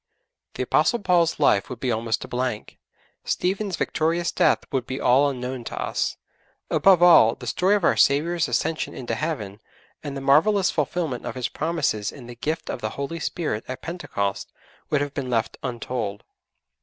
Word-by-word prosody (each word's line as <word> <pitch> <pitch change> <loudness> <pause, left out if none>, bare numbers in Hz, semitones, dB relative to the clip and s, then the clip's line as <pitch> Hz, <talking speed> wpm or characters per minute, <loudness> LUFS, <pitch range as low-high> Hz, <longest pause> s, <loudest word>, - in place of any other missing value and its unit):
The - - -1
Apostle 240 - +2
Paul's 175 -5 +2
life 100 -1 +3
would 125 - -7
be 130 - -1
almost 110 0 -1
a - - -11
blank. 125 -3 -3 0.4
Stephen's 190 +1 -1
victorious 165 +3 0
death - - +2
would 130 -3 -1
be 130 - -4
all 135 +4 +4
unknown 125 -1 -5
to - - -5
us. - - -2 0.5
Above 185 -3 +5
all, 120 -10 +7
the - - -10
story 180 - +2
of 205 - -1
our - - +4
Saviour's 165 +4 +2
ascension 160 - -1
into 125 - -4
Heaven, 110 -11 -4 0.4
and 140 -2 -5
the - - -3
marvellous 175 +9 +4
fulfilment 150 -3 -2
of - - -5
His 125 -2 -2
promises 150 -10 -1
in 135 -4 -12
the 120 - -9
gift 155 +7 -3
of - - -4
the 110 - -2
Holy 140 +4 -4
Spirit 150 -14 -2
at 130 - -7
Pentecost, 135 - -3 0.4
would 150 - +1
have 145 -1 -3
been 130 -3 -4
left 115 -1 -1
untold. 120 -5 -4
140 Hz, 175 wpm, -24 LUFS, 120-170 Hz, 0.5 s, all